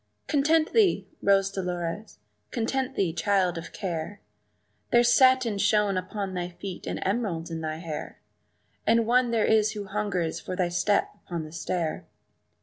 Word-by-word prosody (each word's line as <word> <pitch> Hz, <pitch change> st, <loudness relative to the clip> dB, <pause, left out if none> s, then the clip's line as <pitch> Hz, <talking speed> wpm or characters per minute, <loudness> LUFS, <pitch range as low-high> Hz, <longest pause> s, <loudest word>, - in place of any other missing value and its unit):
"Content 310 Hz, +2 st, +2 dB
thee, 370 Hz, -, +3 dB
Rose 195 Hz, 0 st, +3 dB
Dolores; 180 Hz, -, -4 dB, 0.3 s
content 255 Hz, +3 st, -2 dB
thee, 180 Hz, -5 st, 0 dB
child 190 Hz, -1 st, +1 dB
of 165 Hz, 0 st, -7 dB
care! 185 Hz, +1 st, -4 dB, 0.7 s
There's 240 Hz, 0 st, +5 dB
satin 255 Hz, -4 st, +4 dB
shoon 205 Hz, -1 st, +3 dB
upon 190 Hz, +1 st, -3 dB
thy 175 Hz, -1 st, -3 dB
feet 180 Hz, +1 st, -8 dB
and -, -, -3 dB
emeralds 190 Hz, -6 st, -1 dB
in 165 Hz, 0 st, -4 dB
thy 155 Hz, -1 st, -3 dB
hair, 160 Hz, -2 st, -6 dB, 0.7 s
And 230 Hz, 0 st, +4 dB
one 245 Hz, +1 st, +3 dB
there 230 Hz, -2 st, +2 dB
is 220 Hz, 0 st, +3 dB
who 205 Hz, -2 st, -5 dB
hungers 195 Hz, -5 st, -2 dB
for 185 Hz, -, -5 dB
thy 180 Hz, -2 st, 0 dB
step 200 Hz, +4 st, +1 dB
upon 170 Hz, -2 st, -4 dB
the 155 Hz, -, -9 dB
stair." 165 Hz, -1 st, -3 dB
200 Hz, 150 wpm, -27 LUFS, 175-225 Hz, 0.7 s, There's